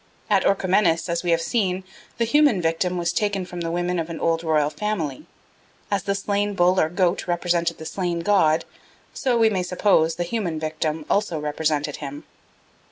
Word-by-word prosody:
At 195 -2 +4
Orchomenus, 185 -3 +2
as 170 0 0
we 175 - -3
have 165 0 +2
seen, 190 -3 0 0.3
the 235 - +1
human 285 -3 +4
victim 175 +2 0
was 170 0 -1
taken 205 -3 0
from 180 -1 -7
the 165 - -2
women 175 +1 -1
of 165 0 -3
an 165 - -5
old 165 0 0
royal 155 -2 +2
family. 165 -7 -3 0.6
As 200 -2 +1
the 200 +2 -1
slain 205 +1 -1
bull 180 0 +3
or 155 - +2
goat 180 +1 0
represented 175 -1 0
the 160 - -9
slain 175 -1 -2
god, 165 -4 +3 0.5
so, 255 -3 0
we 225 -1 +4
may 190 -3 0
suppose, 180 -3 +2
the 175 - -2
human 175 -4 -2
victim 155 0 -3
also 200 -6 0
represented 150 -1 -1
him. 145 0 -7
175 Hz, 180 wpm, -23 LUFS, 160-195 Hz, 0.6 s, At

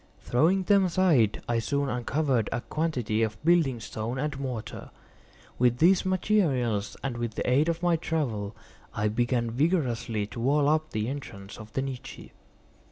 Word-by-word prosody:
Throwing 170 +10 +2
them 200 0 +4
aside, 165 - +2
I 120 -1 +1
soon 140 +5 -1
uncovered 130 -1 0
a 120 - -2
quantity 125 -5 -1
of 110 -1 -1
building 160 -8 +3
stone 110 +3 -5
and 145 0 -3
mortar. 125 -5 -5 0.7
With 120 -1 +3
these 180 +6 +4
materials 145 - +1
and 130 -3 -3
with 120 -2 -3
the - - -3
aid 140 +6 +3
of 170 +1 -2
my 175 -2 +3
trowel, 120 -11 -2 0.4
I 105 0 +1
began 120 +1 0
vigorously 120 - 0
to 110 - -9
wall 140 +4 +2
up 155 +1 +1
the 110 -3 -2
entrance 110 -8 -7
of 105 -1 -11
the 135 - -1
niche. 135 -2 -7
130 Hz, 160 wpm, -27 LUFS, 115-155 Hz, 0.7 s, them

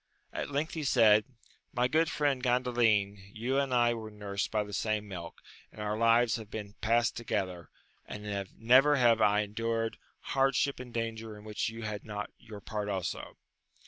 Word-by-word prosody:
At - - -3
length 145 +3 -2
he 160 -2 -3
said, 110 -6 +5 0.5
my 125 -1 +2
good 160 +4 +2
friend 145 -3 0
Gandalin, 120 -5 +2 0.2
you 125 +5 0
and 140 -2 -1
I 120 -1 +4
were 110 -2 -6
nursed 100 -2 -3
by 105 -1 0
the 105 0 -10
same 105 +1 -1
milk, 85 -4 -8 0.3
and - - -14
our 105 0 -1
lives 115 +1 +4
have 110 -2 -9
been 105 -2 -6
past 120 +2 +2
together, 90 -7 -3 0.4
and 100 -2 -5
never 130 +6 +6
have 120 -4 +4
I 105 0 +4
endured 115 +2 -2 0.3
hard 135 0 +3
ship 140 -2 +1
and 125 -1 -8
danger 115 -2 -4
in 105 - -13
which 105 0 -2
you 115 0 -8
had 105 -1 -4
not 105 -2 -5
your 110 -4 -10
part 105 -1 -4
also. 95 -3 -4
110 Hz, 175 wpm, -31 LUFS, 105-120 Hz, 0.5 s, never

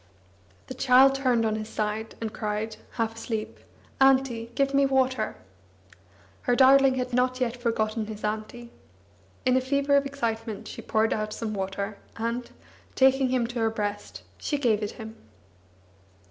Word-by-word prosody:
The - - -7
child 260 +1 +5
turned 255 -4 +1
on 215 -1 0
his 215 0 -5
side, 215 +1 -3
and 225 -1 -4
cried, 215 0 -3 0.2
half 225 -1 -1
asleep: 220 -1 -4 0.4
"Auntie, 265 -4 +3
give 275 0 +1
me 275 0 +4
water." 260 -4 +1 1.1
Her 245 - +1
darling 270 0 +6
had 250 -1 -3
not 255 +1 +1
yet 245 -2 0
forgotten 225 -2 -1
his 215 -1 -8
auntie! 220 +3 -4 0.7
In 255 0 +4
a 260 - +3
fever 280 +2 +1
of 280 0 +3
excitement, 225 -5 -4
she - - -8
poured 220 0 +1
out 215 0 -3
some 220 -1 -4
water, 200 +1 -4 0.2
and, 235 +2 -3 0.5
taking 265 0 +4
him 250 -2 +1
to 240 +1 -4
her 225 0 +2
breast, 205 -2 -4 0.2
she 290 - -1
gave 230 -6 +1
it 210 - -3
him. 220 -1 -9
235 Hz, 155 wpm, -26 LUFS, 220-260 Hz, 1.1 s, darling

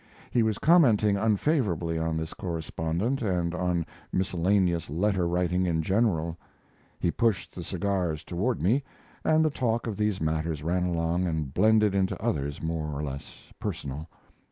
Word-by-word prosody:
He 120 - +3
was 110 -2 +1
commenting 115 - +5
unfavorably 100 - +1
on 80 0 -1
this 80 0 -4
correspondent 85 - -2
and 90 -5 0
on 90 -2 0 0.3
miscellaneous 90 -2 +1
letter 90 +3 +1
writing 90 +1 +1
in 80 -2 +1
general. 85 -4 +1 0.6
He 85 - +1
pushed 115 -3 0
the 90 - -6
cigars 90 -4 -1
toward 100 +7 -1
me, 120 +10 +3 0.4
and 155 0 +4
the 155 - +2
talk 120 -4 0
of 110 -4 -3
these 105 -2 0
matters 80 -1 -1
ran 90 +2 +1
along 85 +1 0
and 80 -5 -2
blended 105 0 +4
into 95 -1 0
others 70 +2 -2
more 80 -1 -2
or - - -2
less 70 0 -8
personal. 70 +4 -5
90 Hz, 150 wpm, -27 LUFS, 80-105 Hz, 0.6 s, commenting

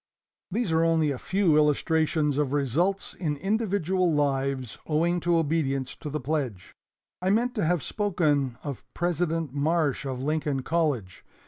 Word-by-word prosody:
"These 205 -1 -1
are 160 0 +3
only 160 -2 +3
a 130 - -4
few 185 -5 +2
illustrations 150 0 +2
of 145 -2 0
results 155 +8 0
in 150 -5 -2
individual 190 -2 +1
lives 135 -4 -1
owing 170 +3 +1
to 170 0 +2
obedience 140 -5 0
to 150 - -6
the 150 +1 -2
pledge. 130 - -3 0.5
I 185 - +1
meant 235 +5 +2
to 210 -9 0
have 175 -1 +1
spoken 150 - 0
of 140 -6 -5
President 165 -3 -1
Marsh 150 0 +1
of 130 -2 -3
Lincoln 145 -1 -1
College. 140 - -1
155 Hz, 145 wpm, -27 LUFS, 140-175 Hz, 0.5 s, are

